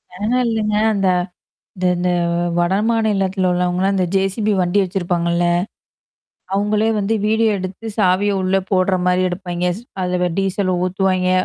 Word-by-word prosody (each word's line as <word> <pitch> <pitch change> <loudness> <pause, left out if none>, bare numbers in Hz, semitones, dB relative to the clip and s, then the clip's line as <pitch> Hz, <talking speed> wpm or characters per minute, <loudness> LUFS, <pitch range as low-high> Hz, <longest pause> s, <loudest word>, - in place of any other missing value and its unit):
அதுலான் 230 +6 0
இல்லங்க 215 -2 0 0.2
அந்த 195 -2 0 0.7
இந்த 185 - -2
இந்த 180 +1 0 0.5
வடமாநிலத்தில 195 -1 +1
உள்ளவங்கலா, 180 +2 0
இந்த 185 -1 +1
ஜேசிபி 195 +3 0
வண்டி 180 +3 +1
வச்சிருப்பாங்கல்ல. 175 -2 -1 1.1
அவங்களே 210 +2 +1
வந்து 210 +2 0
வீடியோ 220 +1 +2
எடுத்து 190 +4 -6
சாவிய 200 0 +2
உள்ள 185 +1 +1
போடுற 185 -1 +2
மாரி 180 0 +2
எடுப்பா்ங்க.ஸ் 180 +2 -3 0.2
அதில 180 0 0
டீசல் 195 0 0
ஊத்துவாய்ங்க, 185 0 0
190 Hz, 120 wpm, -19 LUFS, 180-205 Hz, 1.1 s, வீடியோ